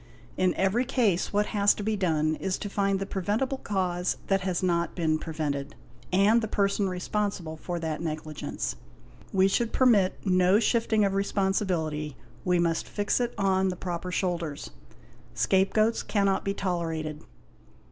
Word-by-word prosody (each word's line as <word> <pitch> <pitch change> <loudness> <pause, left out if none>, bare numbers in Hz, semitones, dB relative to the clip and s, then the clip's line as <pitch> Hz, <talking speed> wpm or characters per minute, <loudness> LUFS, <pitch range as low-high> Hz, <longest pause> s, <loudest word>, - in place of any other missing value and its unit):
In 185 -1 +1
every 195 +6 +2
case 230 -9 +1
what 205 +1 +2
has 205 -1 +4
to 210 - -5
be 215 +1 0
done 155 -5 +1
is 190 -1 -2
to 205 - -6
find 200 -1 +1
the 195 - -3
preventible 210 +8 -1
cause 180 -3 -1
that 195 -1 +2
has 185 -1 -1
not 170 -2 0
been 160 -3 +1
prevented, 145 -4 -3 0.4
and 200 +5 +4
the 220 - -2
person 200 -1 +1
responsible 180 -2 -2
for 175 +2 -5
that 160 -1 -3
negligence. 155 -2 -4 0.6
We 190 0 +4
should 230 +4 0
permit 215 -8 +4
no 185 +1 +4
shifting 225 -2 +2
of 195 - 0
responsibility, 185 -7 -1 0.3
we 180 0 +2
must 170 -1 0
fix 205 +3 0
it 240 -1 -1
on 190 -1 +2
the 185 - -1
proper 180 0 -4
shoulders; 170 -5 -2 0.6
scapegoats 215 +4 +2
cannot 200 -2 +1
be 195 0 -2
tolerated. 165 -5 -3
190 Hz, 150 wpm, -27 LUFS, 170-205 Hz, 0.6 s, has